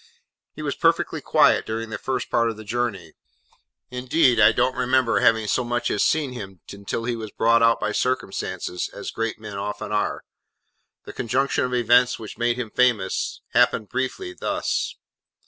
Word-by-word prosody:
He - - -7
was - - -1
perfectly - - +1
quiet - - +4
during 110 0 -4
the 105 - -4
first 130 -1 -3
part 115 0 +2
of 110 - -6
the 110 - -9
journey: 105 -7 -3 0.8
indeed 125 0 +2
I 105 0 +7
don't 130 +3 +1
remember 130 -1 +2
having 110 -1 +3
so 125 +4 +1
much 120 0 -1
as 105 - +1
seen 145 -5 +1
him 95 -6 -8
until 100 +3 -5
he 120 0 -1
was 110 -2 -6
brought 115 +3 +3
out 115 0 +4
by 105 - -1
circumstances, 95 -8 -2
as - - -7
great 115 0 -3
men 105 -2 -7
often 105 +1 -5
are. 105 -1 -1 0.8
The - - -9
conjunction 125 +3 0
of 125 0 -2
events 125 +1 +4
which 110 - -9
made 120 0 +1
him 120 -4 -4
famous, 115 -7 +1
happened, 105 - +3
briefly, 130 - -3
thus. - - -2
115 Hz, 170 wpm, -23 LUFS, 105-125 Hz, 0.8 s, I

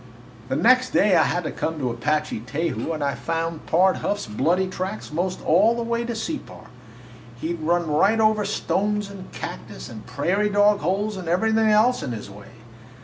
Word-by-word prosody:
"The 130 - 0
next 255 - +4
day 200 -3 +4
I 165 - +6
had 175 +2 0
to - - -3
come 160 0 -3
to 130 -4 -1
Apache 150 -2 -2
Teju 165 +3 -2
and 155 -2 -3
I 140 -1 0
found 165 -1 -3
Pard 185 +3 +3
Huff's 205 -7 -2
bloody 160 - +1
tracks 185 +1 -5
most 180 +3 -2
all 205 +9 +4
the 235 - -2
way 235 0 -1
to 235 -1 -3
Separ. 300 +8 -6 0.7
He 165 - -2
'd 170 - -7
run 170 +2 +1
right 195 +9 +2
over 215 -1 +3
stones 205 0 -1
and 190 -2 -10
cactus - - -7
and 110 -1 -10
prairie 180 +11 0
dog 205 0 +4
holes 200 +5 -1
and 180 -3 -7
everything 220 +5 +2
else 220 +4 +4
in 125 - -4
his 105 -2 -7
way. 100 +1 -12
185 Hz, 190 wpm, -23 LUFS, 155-210 Hz, 0.7 s, I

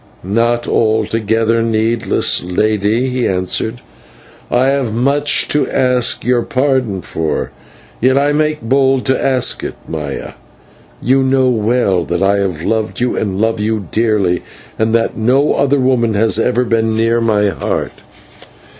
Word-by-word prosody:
"Not 115 +5 0
altogether 110 +1 +1
needless, 115 0 +1
Lady," 105 +6 0
he 125 -1 -1
answered. 95 +5 -2 0.7
"I 125 +2 +2
have 135 -4 0
much 140 +4 +1
to 150 - +1
ask 125 -2 +1
your 125 -1 +2
pardon 130 -8 -1
for, 80 -1 -3 0.5
yet 130 +3 +2
I 145 +1 +2
make 150 -3 0
bold 135 +2 +1
to 130 - 0
ask 130 -2 +1
it. - - -5
Maya, 75 -4 -5 0.7
you 135 +2 +3
know 130 -1 +2
well 110 -5 +1
that 85 +2 -2
I 100 +1 +3
have 90 -5 -2
loved 110 +2 -2
and 110 -5 -1
love 110 0 0
you 105 -4 -2
dearly, 105 -6 +1 0.4
and 110 +1 +1
that 115 0 0
no 130 +6 +2
other 140 0 +1
woman 125 -4 +1
has 110 +1 +2
ever 125 +2 +1
been 115 -2 0
near 115 +1 +1
my 105 -3 +2
heart." - - -3
115 Hz, 140 wpm, -15 LUFS, 105-130 Hz, 0.7 s, you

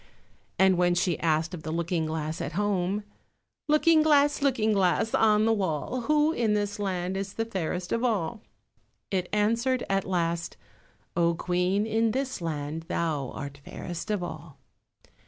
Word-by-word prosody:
And 190 -2 +4
when 175 0 +3
she 175 -2 +1
asked 160 +2 +1
of 170 - -6
the 155 - -6
Looking 165 0 -1
glass 155 0 -3
at 145 - -4
home— 200 +1 0 0.6
"Looking 310 +1 +5
glass, 290 -2 +4
Looking 235 -6 +2
glass, 195 +3 +2
on 215 -1 +4
the 225 - +4
wall, 195 - -1
Who 300 +1 +4
in 225 -8 +1
this 205 0 -2
land 185 -2 -2
is 195 0 -4
the 225 - -2
fairest 180 -4 -3
of 230 - 0
all?" 215 -3 0 0.7
it 185 -2 -1
answered 230 +5 +1
at 195 -1 +2
last— 170 -2 -1 0.6
"Oh, 170 0 +2
Queen, 180 +4 0
in 225 0 +1
this 265 -5 -2
land 160 0 -4
thou 150 -6 -1
art 140 0 -7
fairest 175 +6 -6
of 205 -4 0
all." 155 -3 -8
190 Hz, 155 wpm, -27 LUFS, 170-225 Hz, 0.7 s, Looking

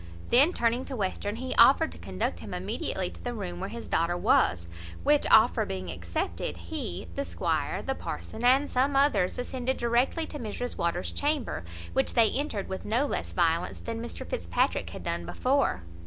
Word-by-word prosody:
Then, 280 +8 +7
turning 240 -3 +1
to 270 - -6
Western, 205 0 -2
he 255 +2 -3
offered 320 +4 +6
to - - -11
conduct - - -3
him - - -6
immediately - - -2
to - - -13
the 245 -1 -3
room 180 -5 -5
where 190 +2 -4
his 235 +2 -7
daughter 170 +2 +1
was; 90 - +3 0.4
which - - +3
offer - - +6
being 95 -2 -4
accepted, 85 +1 -3
he, 85 0 -5
the 85 - -2
squire, 85 -1 -1
the - - -1
parson, 85 - -6
and 265 +4 +5
some 270 +3 +1
others, 275 -10 +3
ascended 255 +1 -2
directly 240 +7 +1
to 295 - -7
Mrs 240 +2 -4
Waters's 170 +1 -1
chamber, 290 - -1 0.3
which 135 - +1
they 230 -2 +5
entered 265 -8 -2
with 190 - -5
no 235 +7 +1
less - - -3
violence 170 0 +1
than 230 0 -5
Mr 235 - -7
Fitzpatrick - - 0
had - - -8
done - - -2
before. 260 - 0
230 Hz, 180 wpm, -28 LUFS, 170-260 Hz, 0.4 s, Then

